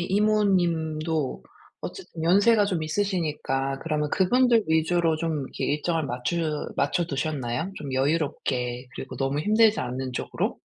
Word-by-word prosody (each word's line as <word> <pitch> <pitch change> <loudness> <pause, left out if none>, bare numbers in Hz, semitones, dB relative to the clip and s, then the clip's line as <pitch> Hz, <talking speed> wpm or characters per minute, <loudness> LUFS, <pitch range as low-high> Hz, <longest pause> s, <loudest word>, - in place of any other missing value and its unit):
이모님도 175 -7 +1 0.4
어쨌든 270 - -7
연세가 205 +4 +5
좀 180 -5 -1
있으시니까 155 -7 -1
그러면 150 -2 -1
그분들 235 +3 +3
위주로 160 0 +2
좀 160 -2 -1
이렇게 - - -5
일정을 160 +1 -1
맞추 150 +5 -2
맞춰두셨나요? 145 0 -1
좀 140 -3 -6
여유롭게 130 -3 -1
그리고 - - -7
너무 135 +2 0
힘들지 215 +3 +4
않은 130 +1 -4
쪽으로? - - -2
160 Hz, 325 characters per minute, -26 LUFS, 140-185 Hz, 0.4 s, 연세가